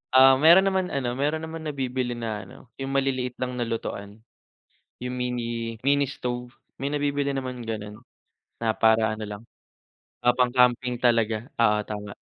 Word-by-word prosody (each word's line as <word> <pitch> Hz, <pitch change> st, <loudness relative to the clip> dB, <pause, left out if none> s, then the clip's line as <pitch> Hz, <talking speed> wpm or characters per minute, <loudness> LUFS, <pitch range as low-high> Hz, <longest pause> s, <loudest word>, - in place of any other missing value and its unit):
Ah, 130 Hz, 0 st, +8 dB
meron 170 Hz, +7 st, +7 dB
naman 190 Hz, -1 st, +1 dB
ano, 125 Hz, -3 st, -1 dB
meron 150 Hz, +3 st, 0 dB
naman 160 Hz, 0 st, -6 dB
nabibili 130 Hz, -4 st, -2 dB
na 110 Hz, -3 st, -4 dB
ano, 120 Hz, -, -15 dB
yung 135 Hz, 0 st, -4 dB
maliliit 130 Hz, -2 st, 0 dB
lang 125 Hz, 0 st, -2 dB
na 120 Hz, -, -1 dB
lutuan, 105 Hz, -2 st, -5 dB, 0.8 s
yung 125 Hz, 0 st, -4 dB
mini 120 Hz, -2 st, -3 dB
mini 140 Hz, +1 st, +3 dB
stove, 125 Hz, 0 st, -4 dB, 0.3 s
may 140 Hz, -, -2 dB
nabibili 145 Hz, -1 st, 0 dB
naman 130 Hz, -2 st, -4 dB
ganun, 105 Hz, 0 st, -6 dB, 0.6 s
na, 115 Hz, -1 st, +1 dB
para, 110 Hz, 0 st, +3 dB
ano 110 Hz, -, -5 dB
lang, 105 Hz, 0 st, -7 dB, 0.8 s
ah, 125 Hz, 0 st, +5 dB
pang-camping 125 Hz, 0 st, +3 dB
talaga, 115 Hz, 0 st, +2 dB
oo, 105 Hz, -2 st, +4 dB
tama. 105 Hz, -1 st, -6 dB
125 Hz, 150 wpm, -25 LUFS, 115-135 Hz, 0.8 s, Ah